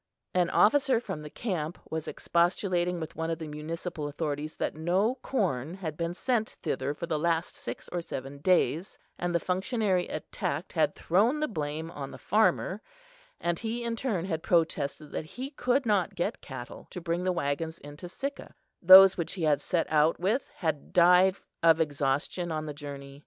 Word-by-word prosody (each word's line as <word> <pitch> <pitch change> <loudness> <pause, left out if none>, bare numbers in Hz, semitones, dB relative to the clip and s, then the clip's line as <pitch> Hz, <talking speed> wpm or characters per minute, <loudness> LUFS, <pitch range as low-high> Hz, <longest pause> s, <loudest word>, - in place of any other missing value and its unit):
An 180 -2 +2
officer 260 +2 +4
from 195 -9 -6
the 150 - -8
camp 175 -5 -3
was 160 -1 -3
expostulating 175 0 +1
with 160 - -6
one 165 0 -2
of 165 - -1
the 160 -1 -6
municipal 155 +1 -5
authorities 150 0 -3
that - - -2
no 180 +9 +1
corn 170 - -1
had 165 -6 -5
been 170 +2 -3
sent 235 -1 -1
thither 140 +3 -1
for 170 - -4
the 160 -3 -1
last 165 +1 0
six - - -7
or 175 - -2
seven 135 -3 -7
days, 175 +2 +1 0.2
and 175 0 -1
the - - +4
functionary 190 +1 0
attacked - - -4
had - - +2
thrown 220 - +2
the 305 - +1
blame 155 -3 -4
on 140 -4 -6
the - - -9
farmer, 210 -1 +1 0.6
and 175 -1 -1
he 230 +2 -3
in 235 -1 -1
turn 215 -8 -1
had 160 -4 -2
protested 155 -3 0
that - - -4
he 260 - -7
could 265 -1 +1
not 200 -3 +1
get 175 - -2
cattle 130 -3 -9
to - - -6
bring 170 +1 -2
the 185 - +2
waggons 160 0 -2
into 145 +4 -10
Sicca; 275 +9 -6 0.3
those 190 +1 +10
which 170 - -3
he 180 - -4
had 150 -2 +3
set 175 -3 0
out 155 +1 +3
with 210 +9 0
had 160 -5 -3
died 180 +2 +6 0.3
of 165 -1 +5
exhaustion 145 +3 -1
on 155 -1 -2
the 150 - -5
journey. 140 -1 -8
170 Hz, 180 wpm, -29 LUFS, 155-190 Hz, 0.6 s, those